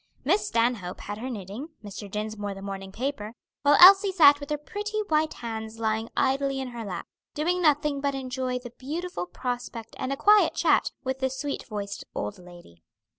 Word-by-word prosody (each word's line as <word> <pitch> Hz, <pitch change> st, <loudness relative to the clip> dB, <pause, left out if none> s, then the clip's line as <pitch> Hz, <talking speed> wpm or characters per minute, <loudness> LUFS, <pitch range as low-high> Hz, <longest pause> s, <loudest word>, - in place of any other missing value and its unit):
Miss 380 Hz, +9 st, +2 dB
Stanhope 230 Hz, -6 st, 0 dB
had 205 Hz, +1 st, -6 dB
her 255 Hz, +3 st, -4 dB
knitting, 215 Hz, -, -6 dB, 0.2 s
Mr. 205 Hz, 0 st, -8 dB
Dinsmore 210 Hz, -1 st, -4 dB
the 195 Hz, -, -9 dB
morning 195 Hz, -1 st, -6 dB
paper, 230 Hz, -2 st, -4 dB, 0.3 s
while 290 Hz, 0 st, +5 dB
Elsie 390 Hz, +2 st, +9 dB
sat 290 Hz, -6 st, +7 dB
with 285 Hz, -, -8 dB
her 300 Hz, -, 0 dB
pretty 420 Hz, +7 st, -5 dB
white 310 Hz, 0 st, +2 dB
hands 220 Hz, -1 st, -6 dB
lying 220 Hz, 0 st, -1 dB
idly 275 Hz, 0 st, +1 dB
in 260 Hz, -1 st, -4 dB
her 240 Hz, -2 st, -6 dB
lap, 180 Hz, -5 st, -5 dB, 0.3 s
doing 350 Hz, +4 st, 0 dB
nothing 295 Hz, -3 st, +2 dB
but 280 Hz, -1 st, 0 dB
enjoy 255 Hz, -1 st, -2 dB
the 245 Hz, -1 st, -9 dB
beautiful 300 Hz, -, -4 dB
prospect 240 Hz, +1 st, -5 dB
and 260 Hz, -, -2 dB
a 275 Hz, -, -1 dB
quiet 420 Hz, +5 st, +5 dB
chat -, -, +3 dB
with 265 Hz, 0 st, -2 dB
the 265 Hz, 0 st, +1 dB
sweet 275 Hz, +2 st, -4 dB
voiced 205 Hz, -2 st, -5 dB
old 200 Hz, -, -4 dB
lady. 175 Hz, -, -15 dB
255 Hz, 180 wpm, -27 LUFS, 210-290 Hz, 0.3 s, Elsie